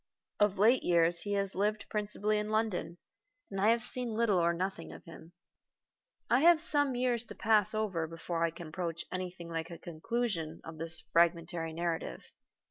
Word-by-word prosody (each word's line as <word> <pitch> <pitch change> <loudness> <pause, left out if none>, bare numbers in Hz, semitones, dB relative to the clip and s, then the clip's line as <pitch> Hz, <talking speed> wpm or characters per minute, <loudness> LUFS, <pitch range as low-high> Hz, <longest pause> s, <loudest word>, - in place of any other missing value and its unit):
Of 205 -1 +3
late 230 +6 +5
years 170 0 +2
he 205 - -3
has 195 -1 +1
lived 210 +2 -1
principally 210 0 -1
in 210 0 -3
London, 215 -5 -1 0.5
and 195 -1 -3
I 210 - +5
have 230 0 +3
seen 245 -2 +2
little 215 -5 +2
or 170 0 +3
nothing 180 0 -4
of - - -11
him. 165 0 -13 0.9
I 245 - +4
have 335 +2 +6
some 290 -5 +2
years 245 -2 +1
to - - -9
pass 215 -1 +2
over 190 -7 -1
before 165 +1 -3
I 170 - +2
can 165 0 -9
approach 170 -1 -4
to - - -11
anything 180 -2 -5
like 165 0 -4
a 170 - -8
conclusion 170 -1 -3
of 160 -1 -9
this 165 0 -5
fragmentary 170 -1 +2
narrative. 165 - -4
185 Hz, 180 wpm, -32 LUFS, 165-215 Hz, 0.9 s, have